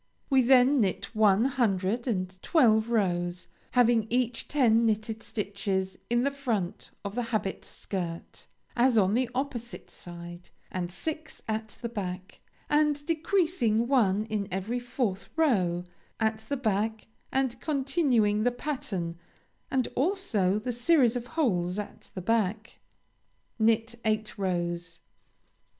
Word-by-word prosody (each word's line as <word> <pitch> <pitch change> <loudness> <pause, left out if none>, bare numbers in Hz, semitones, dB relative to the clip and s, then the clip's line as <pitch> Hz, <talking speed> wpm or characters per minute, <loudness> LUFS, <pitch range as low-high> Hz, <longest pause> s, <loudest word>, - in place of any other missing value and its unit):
We 265 -1 +6
then 260 +2 +5
knit 195 +1 -1
one 215 +1 +4
hundred 230 -3 0
and 185 -4 -2
twelve 225 -8 +4
rows, 180 -5 0 0.3
having 235 -3 +4
each 245 -1 0
ten 235 -6 +4
knitted 220 0 0
stitches 195 -3 -3
in 240 +1 +2
the 280 - +2
front 225 -9 -3 0.2
of 200 - -3
the 245 - -1
habit 210 -4 -2
shirt, 170 -4 -6 0.3
as 245 -1 +4
on 195 -1 +4
the 245 +1 +1
opposite 250 -3 -4
side, 175 0 -10 0.2
and 180 -1 -3
six 310 - -5
at 220 0 -3
the - - 0
back, 185 -5 -6 0.3
and 295 -1 +2
decreasing 320 - +1
one 215 -6 +3
in 215 -3 -2
every 195 +7 -2
fourth 240 -5 -2
row, 190 - +2 0.4
at 220 -1 +1
the 285 - 0
back, 220 -2 -1 0.3
and 260 -3 0
continuing 265 -8 +2
the 245 - +3
pattern, 200 - -4 0.5
and 260 -2 +1
also 260 - +1
the 245 +3 -3
series 245 -1 +3
of 245 0 -3
holes 180 - +1
at 210 - -7
the 185 - -4
back. 220 +1 -1 0.8
Knit 225 +1 +2
eight 215 -1 0
rows. 175 -3 -2
220 Hz, 130 wpm, -28 LUFS, 195-255 Hz, 0.8 s, We